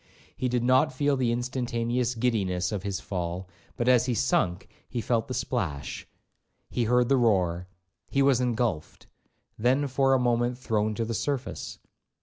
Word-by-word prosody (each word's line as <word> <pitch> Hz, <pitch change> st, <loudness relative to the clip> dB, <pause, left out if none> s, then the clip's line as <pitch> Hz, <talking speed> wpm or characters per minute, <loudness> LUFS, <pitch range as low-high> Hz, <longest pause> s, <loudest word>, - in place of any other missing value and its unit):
He 130 Hz, -, -1 dB
did 120 Hz, -1 st, 0 dB
not 130 Hz, +5 st, +4 dB
feel 145 Hz, +2 st, +1 dB
the 125 Hz, -3 st, +1 dB
instantaneous 120 Hz, 0 st, -1 dB
giddiness 100 Hz, -7 st, 0 dB
of 105 Hz, -3 st, -2 dB
his 100 Hz, 0 st, -3 dB
fall, 90 Hz, -2 st, -4 dB, 0.3 s
but 120 Hz, -, -1 dB
as 125 Hz, -1 st, +5 dB
he 125 Hz, -, 0 dB
sunk 95 Hz, -7 st, +1 dB, 0.2 s
he 120 Hz, -, -3 dB
felt 115 Hz, 0 st, 0 dB
the 130 Hz, -, -4 dB
splash, 75 Hz, -, -3 dB, 0.6 s
he 120 Hz, -, 0 dB
heard 125 Hz, +1 st, +3 dB
the 135 Hz, -, +3 dB
roar. 90 Hz, -7 st, +2 dB, 0.4 s
He 140 Hz, -, +2 dB
was 135 Hz, -2 st, +4 dB
engulphed, 115 Hz, -9 st, -2 dB, 0.5 s
then 130 Hz, +6 st, +2 dB
for 135 Hz, 0 st, +3 dB
a -, -, +2 dB
moment 120 Hz, 0 st, +1 dB
thrown 110 Hz, -3 st, -1 dB
to 115 Hz, -, -1 dB
the 115 Hz, -, -3 dB
surface. 135 Hz, +4 st, -3 dB
120 Hz, 160 wpm, -27 LUFS, 105-125 Hz, 0.6 s, as